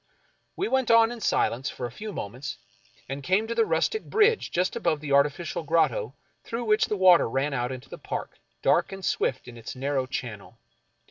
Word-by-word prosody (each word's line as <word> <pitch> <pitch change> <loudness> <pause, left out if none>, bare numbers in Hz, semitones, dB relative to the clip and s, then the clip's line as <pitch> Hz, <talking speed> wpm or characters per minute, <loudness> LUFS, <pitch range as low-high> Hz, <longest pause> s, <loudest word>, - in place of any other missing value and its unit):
We 390 - -1
went 265 - +1
on 230 0 +6
in 240 -2 -8
silence 125 - +1
for 125 - -5
a 120 - -5
few 210 - -7
moments, 125 - -6 0.5
and 135 +2 -5
came 190 +8 +1
to 230 - -3
the 230 -1 +2
rustic 165 - 0
bridge 435 +1 +3
just 180 +2 0
above 160 -3 0
the 145 -1 -6
artificial 145 +4 +1
grotto 150 -7 +1 0.3
through 230 +1 -4
which 215 -1 +3
the 210 - -1
water 185 -8 +6
ran 135 +4 -1
out 125 -1 -1
into 130 -1 -8
the - - -10
park, - - -6 0.2
dark - - +3
and 195 -2 -6
swift 130 -1 -1
in 120 -1 -10
its 115 - -8
narrow 135 0 -1
channel. 115 -6 -6
155 Hz, 195 wpm, -26 LUFS, 130-215 Hz, 0.5 s, on